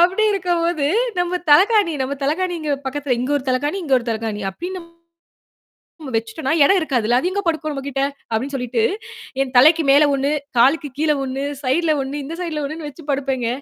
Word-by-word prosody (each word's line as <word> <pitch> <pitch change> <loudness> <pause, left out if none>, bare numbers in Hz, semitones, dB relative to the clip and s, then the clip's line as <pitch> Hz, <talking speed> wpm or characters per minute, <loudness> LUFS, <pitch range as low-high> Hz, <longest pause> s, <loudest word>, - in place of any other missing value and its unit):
அப்படி 370 +5 +4
இருக்கும்போது 345 -5 0 0.3
நம்ம 355 +1 -1
தலையனை, 390 +3 +5
நம்ம 260 +1 -3
தலையனைங்கிற 320 0 -1
பக்கத்துல 270 -1 -1
இங்க 255 - -2
1 265 - -10
தலையனை, 290 +7 0
இங்க 280 -5 +1
1 240 - -10
தலையனை 220 -2 -3
அப்டின்னு 360 - -6 1.2
நம்ம 280 -4 -7
வச்சுட்டோம்னா, 230 +6 -2
இடம் 385 +6 +4
இருக்காதுல்ல. 245 -6 +1
அது 360 - -1
எங்க 405 +1 -1
படுக்கும் 315 -2 -1
நம்மகிட்ட." 275 -1 -3 0.3
அப்டின்னு 260 +6 -2
சொல்லிட்டு, 245 -2 -1 0.6
என் 260 -1 -5
தலைக்கு 315 +4 +6
மேல 290 +2 +6
1, 275 +1 0 0.3
காலுக்கு 280 +4 +3
கீழே 305 -1 +2
1, 270 +1 -3 0.2
சைடுல 310 +5 +2
1 280 +2 -4
இந்த 320 +4 -6
சைடுல 310 -4 -3
1ன்னு 310 +1 -6
வச்சு 320 +3 -14
படுப்பேங்க. 265 -3 -1
290 Hz, 165 wpm, -20 LUFS, 260-335 Hz, 1.2 s, தலைக்கு